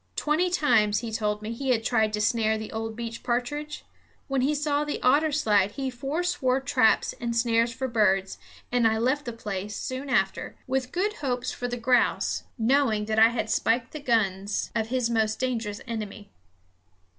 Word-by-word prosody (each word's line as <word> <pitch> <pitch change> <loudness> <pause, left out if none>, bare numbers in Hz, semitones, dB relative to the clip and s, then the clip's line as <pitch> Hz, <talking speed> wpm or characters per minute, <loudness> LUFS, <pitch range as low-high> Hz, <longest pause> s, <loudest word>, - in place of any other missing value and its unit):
Twenty 315 +5 +1
times, 225 -11 +2
he 230 -2 -5
told 210 -1 -1
me, 220 +2 -4
he 265 +3 -4
had 230 -3 +2
tried 220 -2 +2
to 210 - -1
snare 220 0 +2
the 220 0 -7
old 225 0 -4
beech 230 0 -6
partridge. 290 +5 -3 0.4
When 275 -2 0
he 290 +4 +1
saw 295 0 0
the 295 - -3
otter 295 +5 +4
slide 205 -9 +2
he 265 -1 -3
forswore 275 +1 -1
traps 265 -5 +2
and 235 -1 -2
snares 230 0 +2
for 260 +3 -3
birds; 195 -5 +1 0.3
and 240 -2 +3
I 220 0 +1
left 260 +6 0
the 240 - -3
place, 205 -2 -5
soon 260 +2 -5
after, 195 -6 0
with 260 0 -2
good 405 +4 0
hopes 250 -3 -1
for 245 - -4
the 245 0 -3
grouse, 245 +1 +1
knowing 230 -3 +2
that 220 0 0
I 225 +1 +8
had 235 -1 -2
spiked 230 +1 +1
the 305 - -6
guns 205 -6 0
of 220 -1 0
his 250 0 0
most 220 -1 +1
dangerous 230 -5 -2
enemy. 215 -3 -6
235 Hz, 180 wpm, -26 LUFS, 220-265 Hz, 0.4 s, I